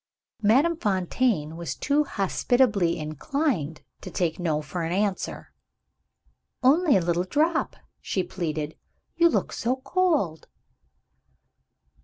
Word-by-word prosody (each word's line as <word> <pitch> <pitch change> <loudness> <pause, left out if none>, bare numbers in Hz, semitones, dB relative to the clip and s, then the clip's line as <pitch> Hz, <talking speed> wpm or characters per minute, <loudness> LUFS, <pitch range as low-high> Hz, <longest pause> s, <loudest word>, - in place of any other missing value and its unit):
Madame 270 +11 +4
Fontaine 190 - 0
was 170 0 -4
too 290 +1 +1
hospitably 200 -4 +1
inclined 155 - -2 0.2
to - - -7
take 170 -2 -1
No 160 -4 0
for 155 +4 -5
an 165 0 -2
answer. 195 +1 -2 1.1
"Only 290 - +5
a - - +1
little 170 +1 0
drop," 315 - 0 0.3
she 190 - -1
pleaded. 155 -5 -4 0.4
"You 340 0 +5
look - - -1
so 245 +3 0
cold." 280 - 0
195 Hz, 110 wpm, -26 LUFS, 165-275 Hz, 1.1 s, Only